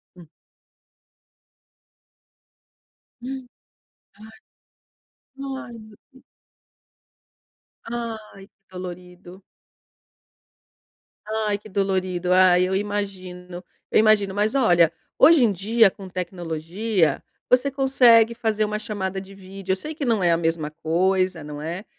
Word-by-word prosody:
Hum. 175 -2 -15 2.9
Hã! 245 - -8 2.1
Ai, 275 -1 -4
ai 240 - -11
meu 215 -1 -15 0.2
Deus! 260 - -20 1.6
Ai, 225 -4 -7
que - - -43 0.2
dolorido! 180 0 -10 1.8
Ai, 215 -1 -1
que 210 +1 -15
dolorido! 185 -2 -1
Ah, 185 -1 +5
eu 185 +1 +1
imagino, 185 -3 -5 0.3
eu - - +4
imagino. 215 -3 +3
Mas 210 +4 0
olha, 175 - +4 0.3
hoje 310 -2 +7
em 220 - +2
dia, 215 +3 +3
com 190 -1 -12
tecnologia, 175 0 -2 0.3
você 255 +3 +3
consegue 245 -4 +4
fazer 220 -2 0
uma 210 0 -3
chamada 195 -3 -4
de 195 +1 -13
vídeo. 195 0 -7
Eu - - +3
sei 305 +11 -6
que 295 - -5
não 230 -5 +1
é 175 - +4
a 165 - +3
mesma 165 -2 -1
coisa, 180 +2 0
não 150 0 -8
é. 170 +6 -5
195 Hz, 110 wpm, -23 LUFS, 180-220 Hz, 2.9 s, hoje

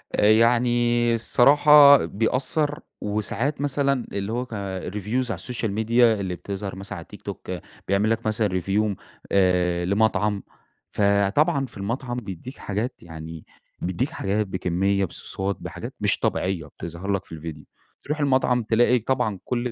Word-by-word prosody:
آآ - - +2
يعني 120 +1 +3
الصراحة 140 +4 +6
بيأثّر، 140 +7 -1 0.2
وساعات 110 +7 -2
مثلًا 140 -2 +1
اللي 100 +2 -3
هو 125 +1 -2
ك - - -26 0.4
الreviews 105 +6 -2
على - - -1
السوشيال 120 0 -3
ميديا 115 +2 +3
اللي 90 -2 -3
بتظهر 95 +2 -6
مثلًا 95 +1 -7
على - - -8
التيك - - -14
توك، - - -7 0.4
بيعمل 100 +3 +2
لك 115 0 -1
مثلًا 105 -4 0
review 100 +2 0 0.4
آآ 90 -2 +2
لمطعم. 105 0 +1 0.5
فطبعًا 100 +8 +2
في 115 - -13
المطعم 120 +5 -3
بيدّيك 110 - -7
حاجات 105 +6 -4
يعني 80 -1 -9 0.4
بيدّيك 105 - -1
حاجات 105 -8 -1
بكمية، 95 +1 0
بصوصات، 95 +3 -4
بحاجات - - -7
مش - - +1
طبيعيّة 90 -4 -1
بتظهر 85 +6 -6
لك 100 -1 -1
في 80 - -9
الڤيديو. 75 -2 -8 0.4
تروح 150 +1 -3
المطعم 130 -4 +2
تلاقي 120 +2 +3
طبعًا 115 -4 -1
كل 125 0 -2
110 Hz, 145 wpm, -24 LUFS, 95-125 Hz, 0.5 s, الصراحة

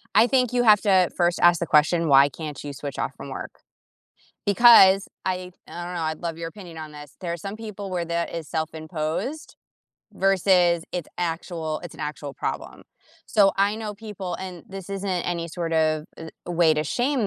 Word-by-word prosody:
I 235 - +6
think 250 -2 +2
you 245 -1 +2
have 215 -3 +6
to 190 -4 +4
first 175 0 +1
ask 175 -1 +6
the 170 - -2
question, 165 +3 +3
"Why 140 0 +6
can't 150 0 -7
you 145 -1 -6
switch 140 -1 -6
off - - -2
from - - -9
work?" - - -6 0.9
Because 200 -2 +7 0.2
I 185 -1 -2 0.2
I 175 - -7
don't 180 - -6
know, 170 - -3
I'd 160 -1 -2
love 165 -2 -4
your 165 0 -5
opinion 175 -3 -11
on 155 -1 -7
this, 150 -1 -12
there's 170 -2 -4
some 200 +1 -5
people 210 -3 -7
where 180 -2 -2
that 170 0 -2
is 165 -2 -5
self-imposed 160 - -4 0.6
versus 180 -3 +3
it's 175 -3 -4
actual 165 -2 -3
it's 175 - -9
an - - -11
actual 150 -1 -5
problem. - - -5 0.4
So, 200 -3 +4
I 200 +1 +2
know 215 -2 -5
people 200 -4 -6
and 180 -3 -8
this 195 -1 -8
isn't 195 0 -3 0.2
any 170 -1 -2
sort 170 0 -4
of, 155 -1 +1
uh, 165 - -8 0.2
way 170 -2 +4
to 155 0 -1
shame 245 - 0
175 Hz, 190 wpm, -24 LUFS, 160-195 Hz, 0.9 s, Because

